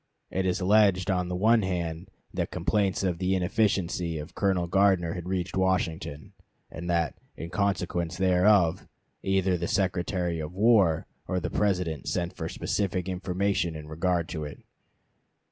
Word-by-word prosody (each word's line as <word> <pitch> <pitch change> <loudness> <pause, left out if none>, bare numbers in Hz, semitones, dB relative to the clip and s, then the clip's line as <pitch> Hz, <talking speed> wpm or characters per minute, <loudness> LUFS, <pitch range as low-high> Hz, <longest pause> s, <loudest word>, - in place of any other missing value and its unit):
It 95 0 0
is 90 - 0
alleged 100 -1 +4
on 90 -1 0
the 90 - -3
one 110 +5 +4
hand 85 -1 -3 0.2
that - - -2
complaints 100 -3 0
of 90 -3 0
the 95 +1 +1
inefficiency 90 -3 0
of 75 +1 -7
Colonel 95 -3 +1
Gardner 95 -2 +3
had 90 -1 -6
reached 90 -2 -2
Washington, 90 -5 -1 0.4
and 85 +1 -6
that, 85 -2 +1 0.2
in 85 +1 -7
consequence 90 -3 -1
thereof, 90 -1 +3 0.3
either 95 -2 +1
the 85 - -2
Secretary 90 -2 0
of 75 +2 -5
War 100 -6 +4 0.2
or 90 - 0
the - - -4
President 90 -7 0
sent 85 -1 -1
for - - -4
specific 90 -3 -2
information 90 -2 -1
in 75 -1 -8
regard 85 +2 0
to 80 -3 -4
it. 75 -1 -8
90 Hz, 150 wpm, -27 LUFS, 85-95 Hz, 0.4 s, alleged